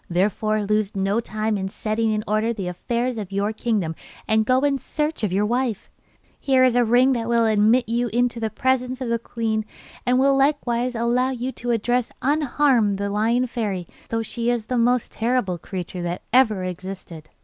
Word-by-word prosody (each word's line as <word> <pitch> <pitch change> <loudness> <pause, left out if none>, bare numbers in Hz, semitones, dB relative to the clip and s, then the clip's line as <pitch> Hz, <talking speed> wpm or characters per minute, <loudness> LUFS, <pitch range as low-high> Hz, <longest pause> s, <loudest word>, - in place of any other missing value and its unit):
Therefore 210 +4 +1
lose 210 0 0
no 195 +3 +1
time 215 -1 -2
in 190 0 -3
setting 220 +2 -1
in 215 0 -1
order 215 +2 +1
the 195 -5 -5
affairs 235 +6 -2
of 200 -2 -6
your 200 +2 -1
kingdom 215 -8 -1 0.3
and 220 0 +2
go 255 +1 +3
in 280 -1 +1
search 300 -1 -3
of 205 - +1
your 200 +3 +1
wife. 240 -2 -1 0.5
Here 265 -2 +3
is 255 -2 +4
a 245 - +4
ring 245 +3 +4
that 230 -2 -2
will 235 -1 +3
admit 220 +3 +3
you 240 +2 0
into 240 +1 0
the 220 -1 -1
presence 255 +2 0
of 255 -3 -3
the 235 0 +1
queen, 225 -2 -2 0.4
and 250 -1 +2
will 275 +1 +4
likewise 255 -3 +1
allow 240 +3 +1
you 255 0 -3
to 245 - -6
address 240 +1 +1
unharmed 270 -7 +2
the 200 0 -2
Lion 230 +4 +2
Fairy, 205 -8 -3 0.2
though 225 0 -1
she 235 +1 -2
is 240 -3 0
the 250 +2 -2
most 245 +1 +2
terrible 225 -6 0
creature 180 +1 -6
that 175 0 -4
ever 220 -7 +4
existed. 180 -3 -7
230 Hz, 190 wpm, -23 LUFS, 210-250 Hz, 0.5 s, is